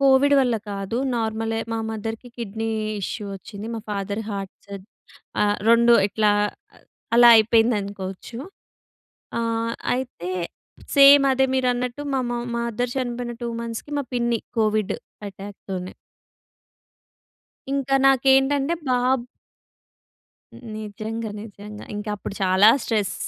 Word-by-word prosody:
Covid 275 +1 +5
వల్ల 250 -3 +2 0.2
కాదు 195 +2 -4 0.2
నార్మలె. 225 0 -1
మా 225 - -1
మదర్‌కి 225 +2 -5
కిడ్నీ 225 -1 -4 0.3
ఇష్యూ 210 +3 -4
వచ్చింది. 200 +2 -9
మా 225 - -4
ఫాదర్ 200 +1 -3
హార్ట్ 195 -2 -5
సజ్ 200 -1 -9 0.6
ఆహ్, 205 0 +2
రెండు 235 +1 +6
ఇట్లా 210 0 +2 0.8
అలా 240 0 +9
అయిపోయిందనుకోవచ్చు. 215 -2 +1 1.0
ఆహ్, 230 0 -1 0.2
అయితే 250 -8 -4 0.7
సేమ్ 280 0 +9
అదే 265 0 +3
మీరన్నట్టు 250 0 0
మా 265 - +2
మ - - -2 0.2
మదర్ 235 +1 -2
చనిపోయిన 245 -2 -3
2 240 - -2
మంత్స్‌కి, 230 +5 -6
మా - - -2
పిన్ని 235 -1 +1 0.2
కోవిడ్ 215 -2 +1 0.3
అటాక్‌ 195 +1 -10
తోనే. 185 -1 -4 1.8
ఇంకా 275 -1 0
నాకేంటంటే 270 +3 +4 0.2
బాబ్ 250 0 +2 1.5
నిజంగ, 215 +2 -5 0.2
నిజంగ. 210 0 -10 0.2
ఇంక 210 +1 -5
అప్పుడు 200 - -7
చాలా 190 +2 +6
స్ట్రెస్, 210 -3 -1
225 Hz, 110 wpm, -23 LUFS, 205-245 Hz, 1.8 s, అలా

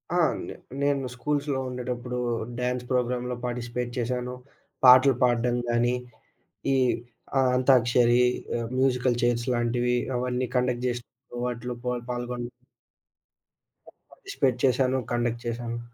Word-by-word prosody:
ఆ! - - +3 0.3
నే - - -6 0.3
నేను 140 -2 +1
స్కూల్స్‌లో 140 +2 -1
ఉండేటప్పుడు, 125 0 -4 0.4
డ్యాన్స్ 125 0 -1
ప్రోగ్రామ్‌లో 125 0 0
పార్టిసిపేట్ 120 0 -3
చేశాను. 125 +1 -2 0.5
పాటలు 130 +1 +8
పాడ్డం 120 0 +2
గానీ, 120 +1 +2 0.8
ఈ - - +3 0.6
ఆ - - +5 0.2
అంతాక్షరి, 125 -1 +4 0.3
ఆహ్, 115 -1 -3
మ్యూజికల్ 125 -2 +2
చైర్స్‌ 120 0 +1
లాంటివి. 120 +1 +1 0.2
అవన్నీ 125 0 -1
కండక్ట్ 125 0 +1
జేసినప్పుడు 120 0 -6
వాటిలో 125 0 -3
పా 125 - 0 0.2
పాల్గొన 120 0 -4 1.5
ప - - -28
పార్టిసిపేట్ 140 - -1
చేశాను. 130 0 +2 0.2
కండక్ట్ 120 0 -1
చేశాను. 120 0 -3
125 Hz, 115 wpm, -26 LUFS, 120-125 Hz, 1.5 s, పాటలు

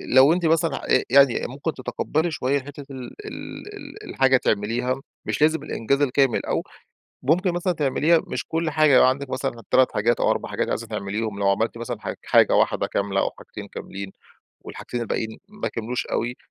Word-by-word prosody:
لو 135 +4 +8
أنتِ 175 0 -1
مثلًا 165 +1 +2
آآ، 130 - +3
يعني 135 -1 +5
ممكن 140 +5 -4
تتقبلي 145 +6 -2
شويّة 140 -2 0
حتّة 140 +1 -10
ال 130 -2 -7
ال 415 0 -8
ال 425 +1 -10
الحاجة 135 0 +4
تِعمليها 120 +4 -1 0.2
مش - - -2
لازم 160 +1 +3
الإنجاز 140 +5 -1
الكامل، 135 -3 +2
أو - - -1 0.6
ممكن 175 +7 +2
مثلًا 175 +1 0
تِعمليها 160 +2 +2
مش - - -3
كل 165 0 -1
حاجة. 155 -3 +4
لو - - +7
عندِك 130 +1 +1
مثلًا 120 -5 -3
3 130 -1 +4
حاجات 115 +3 +1
أو - - +3
4 - - -1
حاجات - - -1
عايزة 115 - -2
تِعمليهم، 105 0 -3
لو 100 -1 +2
عملتِ 110 +4 0
مثلًا 120 -1 -5
ح - - -4
حاجة - - +4
واحدة - - +2
كاملة 100 -1 -1
أو - - 0
حاجتين - - -10
كاملين، 100 0 -7 0.5
والحاجتين 120 - -6
الباقيين 110 0 -3
ما 210 0 -4
كملوش 120 +2 -3
أوي، 120 +2 -2
130 Hz, 180 wpm, -23 LUFS, 115-155 Hz, 0.6 s, لو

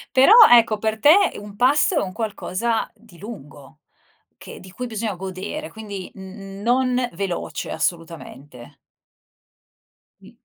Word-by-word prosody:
Però 270 +9 +6 0.2
ecco, 230 -2 +5
per 220 +1 -2
te 290 - +7 0.3
un 205 0 -12
pasto 285 - +3
è 295 - +2
un 185 - -5
qualcosa 225 +1 -3
di 220 -5 -20
lungo 155 - -12 0.6
che - - -12
di 185 0 -14
cui 250 +5 -6
bisogna 220 -2 -4
godere, 190 - -7
quindi 205 -4 -8
n 195 +1 -10
non 250 +1 +1
veloce 180 0 -5
assolutamente. 160 -7 -6 1.4
M - - -16
205 Hz, 125 wpm, -21 LUFS, 185-235 Hz, 1.4 s, te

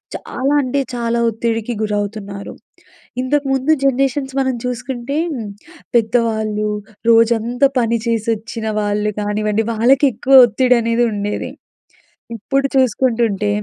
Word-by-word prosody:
చాలా 275 +3 -2
అంటే 270 +2 -1 0.2
చాలా 235 0 -1
ఒత్తిడికి 230 +1 -2
గురవుతున్నారు. 205 -1 -4 0.7
ఇంతకుముందు 270 +1 0
జనరేషన్స్ 270 0 0
మనం 260 -2 0
చూసుకుంటే, 250 +3 -4 0.8
పెద్దవాళ్ళు, 220 -2 +1 0.4
రోజంతా 230 +3 +3
పని 235 0 +1
చేసొచ్చిన 225 0 -2 0.2
వాళ్ళు 210 +1 -1
కానివ్వండి, 210 +1 -1
వాళ్ళకెక్కువ 260 +2 +5
ఒత్తిడి 250 +2 +2
అనేదుండేది. 230 -3 -1 0.8
ఇప్పుడు 275 +6 -1
చూసుకుంటుంటే 230 -5 +1
230 Hz, 90 wpm, -18 LUFS, 215-260 Hz, 0.8 s, వాళ్ళకెక్కువ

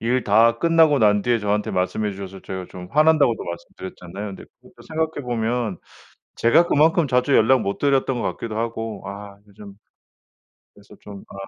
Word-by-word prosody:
일 125 +1 0
다 115 +3 +4
끝나고 165 -4 +4
난 105 -2 +3
뒤에 120 -1 +1
저한테 105 0 -1
말씀해 100 +3 -1
주셔서 95 0 -9
제가 95 -1 -6
좀 90 0 -10
화난다고도 150 -6 +3
말씀드렸잖아요. 90 +3 -8
근데 - - -12 0.2
그것도 - - -19
생각해 160 -2 -2
보면 115 -4 -2 0.6
제가 165 +9 +4
그만큼 160 +1 +3
자주 125 +2 +1
연락 125 +3 +4
못 100 - -3
드렸던 135 -3 +1
것 - - -3
같기도 110 -2 -6
하고 115 -2 -4
아 100 0 -9
이 100 - -21
좀 100 -1 -12 1.0
그래서 - - -18
좀 100 -1 -11
아 - - -14
115 Hz, 360 characters per minute, -22 LUFS, 100-130 Hz, 1.0 s, 다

